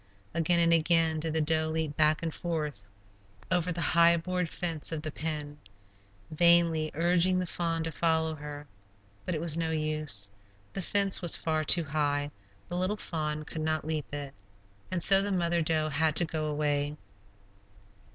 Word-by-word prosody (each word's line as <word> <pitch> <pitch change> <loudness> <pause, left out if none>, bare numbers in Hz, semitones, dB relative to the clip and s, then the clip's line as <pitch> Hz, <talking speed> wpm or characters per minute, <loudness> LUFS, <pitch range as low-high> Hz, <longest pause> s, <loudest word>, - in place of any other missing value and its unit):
Again 170 +1 +2
and 170 0 +4
again 165 -1 +3
did 160 0 -2
the 160 - +2
doe 155 +1 +1
leap 160 -2 -2
back 155 +1 +2
and 165 -2 -3
forth 155 - -4 0.7
over 180 -1 +1
the 170 0 -4
high 170 +1 +4
board 180 0 -2
fence 165 -3 -3
of 155 -2 -4
the 155 - -4
pen, 150 -2 -5 0.7
vainly 170 -1 +4
urging 175 +3 +3
the 185 - -1
fawn 165 -1 -2
to 165 - -3
follow 160 0 +1
her. 150 -1 -8 0.6
But 180 - -1
it 155 - -3
was 165 -2 +2
no 165 -1 -1
use; 155 -10 0 0.4
the 195 - -3
fence 200 +1 +2
was 175 -3 +3
far 155 -1 -1
too 170 +3 +4
high; 145 -1 -1 0.4
the 175 - -5
little 185 +4 -1
fawn 155 -5 -3
could 160 - -6
not 155 -1 -1
leap 155 -2 -3
it, 140 -1 -6 0.6
and 180 -3 -1
so 195 +2 +5
the 200 +1 -2
mother 170 -2 +1
doe 155 -1 0
had 155 +1 +1
to 175 - +6
go 155 -1 -3
away. 145 0 -1
160 Hz, 170 wpm, -29 LUFS, 155-170 Hz, 0.7 s, to